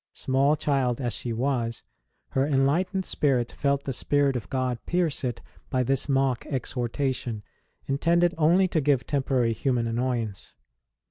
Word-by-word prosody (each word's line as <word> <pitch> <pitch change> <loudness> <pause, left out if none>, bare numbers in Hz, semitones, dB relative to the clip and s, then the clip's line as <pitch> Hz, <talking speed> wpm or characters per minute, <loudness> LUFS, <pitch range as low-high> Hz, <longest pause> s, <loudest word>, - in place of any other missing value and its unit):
Small 135 +3 +2
child 135 -5 0
as 120 -3 -2
she 120 - -4
was, 115 -1 -1 0.5
her 135 - +1
enlightened 155 +7 +1
spirit 130 -5 +1
felt 140 -1 0
the 135 - -3
Spirit 140 +1 +1
of 110 -7 -4
God 130 -2 -2
pierce 175 -6 0
it 120 -2 -3 0.3
by 130 -2 +1
this 135 +3 0
mock 135 -2 +1
exhortation, 125 -3 -2 0.4
intended 170 +5 +2
only 170 +4 +4
to 160 - +1
give 135 -4 +2
temporary 130 -4 +1
human 125 0 0
annoyance. 115 -3 -2
135 Hz, 140 wpm, -26 LUFS, 120-145 Hz, 0.5 s, only